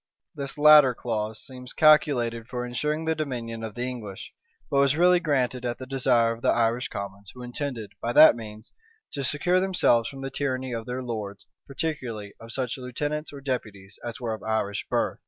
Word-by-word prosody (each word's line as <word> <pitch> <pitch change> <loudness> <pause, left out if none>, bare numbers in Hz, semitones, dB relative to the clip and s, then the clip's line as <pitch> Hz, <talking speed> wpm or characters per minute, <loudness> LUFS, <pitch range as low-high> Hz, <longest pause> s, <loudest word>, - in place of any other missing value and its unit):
This 140 +1 -5
latter 150 -4 +7
clause 110 -2 -3
seems 125 -1 -10
calculated 125 -7 +3
for 125 0 -4
insuring 150 +6 -2
the 160 - +2
dominion 120 -7 -4
of 110 -2 -6
the 120 - -3
English; 115 -6 -6 0.3
but 140 - +1
was 140 0 +4
really 180 +1 +5
granted 130 -6 0
at 120 -1 -2
the 130 - -8
desire 125 -3 +2
of 115 - -11
the - - +2
Irish 120 +1 +1
commons 100 0 -7
who 125 - -9
intended, 120 -4 -5
by 120 - -1
that 155 +4 +9
means, 110 -1 -10 0.4
to 140 - -4
secure 175 +7 +1
themselves 180 -11 +2
from 135 -1 -9
the 135 0 -5
tyranny 130 -2 -2
of 115 -1 -5
their 125 +1 -4
lords, 105 -4 -5 0.2
particularly 130 -8 -4
of 115 0 -11
such 130 +1 -3
lieutenants 145 +5 -3
or 140 -1 -9
deputies 110 -7 -5
as 120 +2 -6
were 115 -3 -2
of 110 - -7
Irish 110 -2 -2
birth. - - 0
125 Hz, 190 wpm, -26 LUFS, 115-140 Hz, 0.4 s, that